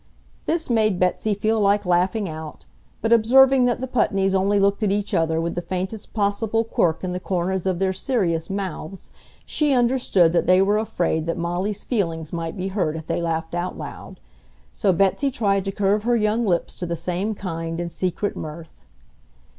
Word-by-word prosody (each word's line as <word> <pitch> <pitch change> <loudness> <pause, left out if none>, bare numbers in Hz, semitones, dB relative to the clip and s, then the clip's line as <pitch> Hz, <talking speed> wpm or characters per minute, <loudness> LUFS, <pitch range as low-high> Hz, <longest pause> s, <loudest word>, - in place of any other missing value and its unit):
This 330 0 0
made 215 -6 +2
Betsy 190 +3 +1
feel 220 +2 0
like 205 0 +2
laughing 185 +4 +1
out, 155 -2 -8 0.4
but 225 +1 +3
observing 255 +3 +6
that 245 0 0
the 260 - -2
Putneys 195 -6 +1
only 195 +2 +2
looked 200 +2 +2
at 210 - +2
each 205 0 -1
other 160 -1 +1
with 170 +1 -2
the 175 - -3
faintest 185 +4 -5
possible 215 +2 +1
quirk 170 -7 0
in 185 - -2
the 180 - -3
corners 185 0 -2
of 185 -2 0
their 190 +1 0
serious 185 -7 -1
mouths, 195 -2 -5 0.3
she 300 -2 +1
understood 240 -9 +3
that 175 - +1
they 185 +1 +6
were 205 +2 +3
afraid 170 -6 -1
that 165 - -1
Molly's 180 +5 -2
feelings 165 - -2
might 165 +2 -4
be 190 +1 -3
hurt 185 -6 -1
if 160 -1 -6
they 170 - -2
laughed 165 -1 -2
out 175 +1 -3
loud. - - -9 0.5
So 195 - +2
Betsy 195 - +2
tried 200 -6 0
to 195 - -1
curve 205 +1 +1
her 240 +2 +1
young 220 +1 +1
lips 175 -3 0
to 175 - -3
the 170 - -2
same 180 +6 -2
kind 165 -3 -4
and 170 0 -4
secret 185 +3 -2
mirth. 160 +1 -8
190 Hz, 185 wpm, -23 LUFS, 170-215 Hz, 0.5 s, observing